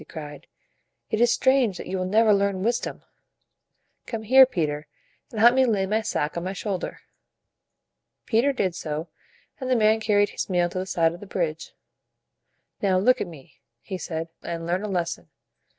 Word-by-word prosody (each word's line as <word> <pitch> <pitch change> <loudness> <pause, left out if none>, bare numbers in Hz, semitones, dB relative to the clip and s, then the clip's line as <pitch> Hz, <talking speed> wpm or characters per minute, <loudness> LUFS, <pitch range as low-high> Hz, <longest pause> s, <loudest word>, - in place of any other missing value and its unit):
he - - -12
cried. 150 -1 -9 0.6
"It 215 - 0
is 240 -1 +5
strange 260 -7 +2
that - - -7
you 190 +1 -3
will 185 - -1
never 215 +2 +4
learn 200 -1 +1
wisdom. 235 +2 -2 1.0
Come 225 -2 -4
here, 260 +4 +7
Peter, 150 - -2 0.4
and 220 - -6
help 235 +2 +7
me 265 +1 +4
lay 210 -6 +1
my 215 +3 0
sack 150 -8 -2
on 170 - -3
my 185 +1 -3
shoul 195 -1 -3
der." - - -7 1.2
Peter 245 +5 +2
did 190 -9 -1
so, 155 -1 -5 0.5
and 260 -2 -4
the 255 - +3
man 220 -1 +4
carried 205 -2 +2
his - - -5
meal 175 -2 +2
to 185 - -4
the 185 - -4
side 165 -3 +2
of 175 - -10
the 205 - -11
bridge. 160 -4 -3 1.1
"Now 190 -2 +2
look 250 +7 +3
at - - -2
me," 155 -6 -14 0.2
he 185 +9 -6
said, 165 -1 -4
"and 165 -1 -5
learn 175 +3 0
a 210 - -4
lesson." 170 - -3
190 Hz, 185 wpm, -25 LUFS, 170-220 Hz, 1.2 s, here